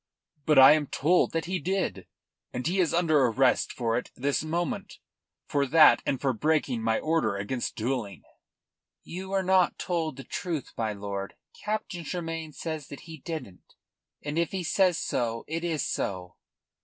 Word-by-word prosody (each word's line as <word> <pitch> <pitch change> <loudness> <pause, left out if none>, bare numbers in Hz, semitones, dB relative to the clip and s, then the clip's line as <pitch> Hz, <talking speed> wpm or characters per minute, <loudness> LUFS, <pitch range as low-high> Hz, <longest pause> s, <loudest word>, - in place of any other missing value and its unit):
"But 150 -2 +4
I 135 +1 +10
am 150 -1 +3
told 170 +8 +2
that 165 0 -1
he 185 +2 -2
did, 190 +4 -2 0.4
and 125 0 -4
he 185 +4 +1
is 175 -4 +3
under 155 -6 +3
arrest 125 +2 +2
for 115 -1 0
it - - -10
this 140 +3 0
moment 170 +2 -3 0.5
for 140 -1 0
that, 155 +3 +7
and 135 - 0
for 135 -2 +1
breaking 145 -2 0
my 110 0 +1
order 155 -11 0
against 115 +5 -3
duelling." 115 -3 -3 0.8
"You 190 +3 -7
were 195 -1 0
not 185 -1 +3
told 165 -5 -2
the 135 - -7
truth, 165 -3 -4
my 110 -2 -1
lord. 100 -1 -5 0.3
Captain 210 -4 -3
Tremayne 165 -2 -4
says 155 -3 -5
that 140 - -9
he 160 -2 -10
didn't, 150 - -8 0.5
and 150 +2 -2
if 170 - -1
he 190 -2 -2
says 180 0 +3
so 115 -5 -2
it 165 +2 -3
is 160 -5 -1
so." 90 -2 -3
155 Hz, 165 wpm, -28 LUFS, 125-170 Hz, 0.8 s, I